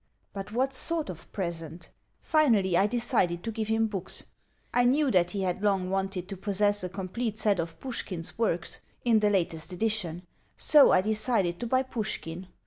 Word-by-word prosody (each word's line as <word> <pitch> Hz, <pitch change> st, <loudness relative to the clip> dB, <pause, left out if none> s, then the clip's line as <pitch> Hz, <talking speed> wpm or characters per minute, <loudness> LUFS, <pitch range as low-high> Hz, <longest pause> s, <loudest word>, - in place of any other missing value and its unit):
But 195 Hz, +1 st, -6 dB
what 260 Hz, +4 st, 0 dB
sort 320 Hz, -, -1 dB
of 175 Hz, -1 st, -13 dB
present? 170 Hz, -3 st, -5 dB, 0.3 s
Finally, 225 Hz, -, +3 dB
I 195 Hz, +4 st, +4 dB
decided 215 Hz, -7 st, +1 dB
to 230 Hz, -, -3 dB
give 220 Hz, -1 st, -3 dB
him 225 Hz, 0 st, +2 dB
books. 195 Hz, -4 st, -4 dB, 0.5 s
I 245 Hz, -, +4 dB
knew 270 Hz, +3 st, +3 dB
that 175 Hz, -2 st, +3 dB
he 195 Hz, +1 st, -3 dB
had 185 Hz, 0 st, -1 dB
long 195 Hz, -3 st, +1 dB
wanted 195 Hz, -2 st, -2 dB
to 195 Hz, -, -5 dB
possess 205 Hz, +1 st, +1 dB
a 180 Hz, -, -3 dB
complete 205 Hz, +4 st, -4 dB
set 205 Hz, -4 st, +2 dB
of 165 Hz, -1 st, -4 dB
Pushkin's 190 Hz, -10 st, -4 dB
works, 195 Hz, -7 st, -1 dB, 0.3 s
in 230 Hz, -2 st, +5 dB
the 210 Hz, -1 st, +3 dB
latest 170 Hz, -4 st, -1 dB
edition; 180 Hz, -3 st, -1 dB, 0.3 s
so, 295 Hz, -2 st, +7 dB
I 185 Hz, -, +5 dB
decided 210 Hz, -4 st, +1 dB
to 240 Hz, -, -3 dB
buy 255 Hz, +2 st, +2 dB
Pushkin. 190 Hz, -8 st, -4 dB
200 Hz, 175 wpm, -28 LUFS, 180-230 Hz, 0.5 s, so